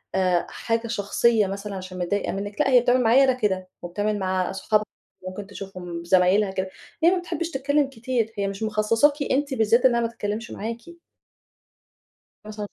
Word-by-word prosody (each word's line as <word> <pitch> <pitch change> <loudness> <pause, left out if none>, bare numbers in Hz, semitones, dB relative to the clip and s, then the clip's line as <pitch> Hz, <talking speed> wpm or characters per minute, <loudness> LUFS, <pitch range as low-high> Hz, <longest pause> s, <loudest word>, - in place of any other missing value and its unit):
آآ 185 -2 +2
حاجة 230 0 -2
شخصية 215 0 +2
مثلًا 200 +1 -5
عشان 185 -1 -7
متضايقة 200 +3 -1
منِك، 205 +6 -3
لأ، 270 - +2
هي 250 -2 +7
بتعمل 250 +1 +3
معايا 245 +5 +6
أنا 260 -1 +4
كده 190 -6 -1
وبتعمل 205 +4 -2
مع 185 -1 0
أصحابها 215 +2 0 0.4
ممكن 195 +2 -7
تشوفهم 185 -4 -7
ب - - -12
زمايلها 190 +3 +4
كده، 190 0 -3 0.3
هي 340 - +8
ما 370 - +1
بتحبش 340 -1 -4
تتكلم 285 +1 +1
كتير، 230 -2 -2
هي 200 -1 0
مش 195 +2 -5
مخصصاكِ 220 +6 +3 0.2
أنتِ 280 0 +1
بالذات 230 +2 +3
إنها 235 -2 +4
ما 230 - +1
تتكلمش 225 0 -5
معاكِ." 230 +11 -6 1.5
مثلًا 210 -1 -6
215 Hz, 170 wpm, -24 LUFS, 195-245 Hz, 1.5 s, هي